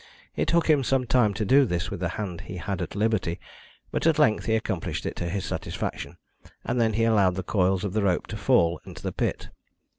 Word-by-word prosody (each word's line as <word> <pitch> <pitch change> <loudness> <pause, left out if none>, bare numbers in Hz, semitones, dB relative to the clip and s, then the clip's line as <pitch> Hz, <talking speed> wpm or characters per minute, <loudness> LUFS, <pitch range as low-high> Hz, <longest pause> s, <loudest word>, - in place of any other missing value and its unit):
It - - 0
took 170 -1 +2
him 150 -4 +4
some 130 0 +1
time 120 -3 +3
to 105 - -1
do 135 +7 +6
this 90 -8 -2
with - - -4
the 90 -1 -1
hand 95 -6 -4
he 90 - -8
had 95 +1 -3
at 90 - -5
liberty, 105 -5 0 0.5
but - - 0
at 165 -2 +4
length 145 -8 +3
he 110 - +2
accomplished 110 - -3
it - - -3
to 85 - -3
his 95 +1 -3
satisfaction, - - -4 0.5
and 120 0 0
then 110 -1 +2
he 115 +2 +1
allowed 100 -5 +3
the 95 - -3
coils 95 0 +1
of 100 -3 -3
the 110 - +1
rope 95 -3 +1
to - - -5
fall 85 +1 +2
into - - -11
the - - -2
pit. - - -2
105 Hz, 230 wpm, -26 LUFS, 90-120 Hz, 0.5 s, do